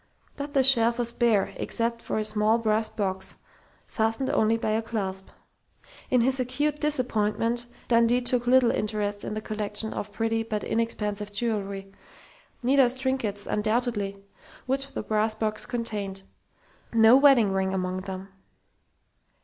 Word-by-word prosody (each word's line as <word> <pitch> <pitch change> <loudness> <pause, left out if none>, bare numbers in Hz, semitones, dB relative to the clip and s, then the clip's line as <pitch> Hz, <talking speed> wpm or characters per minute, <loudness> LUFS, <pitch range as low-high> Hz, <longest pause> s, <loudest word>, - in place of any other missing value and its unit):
But 285 0 -6
the 270 - +5
shelf 235 -3 +5
was 235 -1 -1
bare 235 -4 +1
except 230 0 -2
for - - -3
a 215 - 0
small 215 +1 +2
brass 220 -1 +1
box, 190 -3 -3 0.5
fastened 225 +4 -1
only 220 +1 +2
by 220 - -1
a 220 +1 +1
clasp. 195 -4 -4 0.8
In 250 -2 +3
his 260 +2 +2
acute 290 +4 -1
disappointment 240 -4 0 0.2
Dundee 235 +1 +4
took 245 -1 0
little 250 -1 +5
interest 205 -1 -2
in - - -4
the 215 - -3
collection 215 0 -3
of 205 - -5
pretty 225 +1 -1
but 220 -2 -3
inexpensive 210 -2 -2
jewelry 200 -3 -3 0.7
Nita's 260 0 +3
trinkets, 260 -6 -2
undoubtedly 215 -2 -1 0.5
which 270 +1 -1
the - - -5
brass 215 +1 +1
box 215 -1 -2
contained.... 205 -5 -3 0.7
No 225 +1 +7
wedding 265 -7 +5
ring 190 0 0
among 185 -1 -2
them.... 190 0 -7
225 Hz, 140 wpm, -26 LUFS, 210-240 Hz, 0.8 s, No